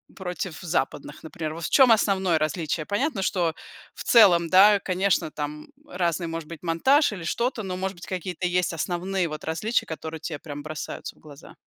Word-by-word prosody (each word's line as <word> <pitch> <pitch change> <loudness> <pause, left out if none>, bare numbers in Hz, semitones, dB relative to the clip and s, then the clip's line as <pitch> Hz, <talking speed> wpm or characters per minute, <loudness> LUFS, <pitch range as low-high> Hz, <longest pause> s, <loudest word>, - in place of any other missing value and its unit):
против 180 -2 -5
западных, 170 -6 -3
например, 160 -1 -5
вот 165 0 -6
в - - -2
чём 260 -4 +6
основное 190 -6 +3
различие? 155 0 -2
Понятно, 230 +2 -1
что 175 -3 0 0.4
в - - -8
целом, 175 -8 +6
да, 200 +3 +7
конечно, 185 -3 0
там 150 0 -6 0.2
разный 175 -1 -1
может 165 -1 -5
быть 170 0 -9
монтаж 260 - +3
или 190 -5 -7
что-то, 235 +7 -1
но 185 -3 -4
может 190 +1 -3
быть 175 - -11
какие-то 180 -1 -3
есть 180 -1 0
основные 180 +3 -1
вот 155 0 -7
различия, 190 +9 -1
которые 160 0 -6
те 155 -1 -5
прям 145 -1 -8
бросаются 155 0 -6
в - - -25
глаза. 145 -1 -14
175 Hz, 180 wpm, -25 LUFS, 160-195 Hz, 0.4 s, да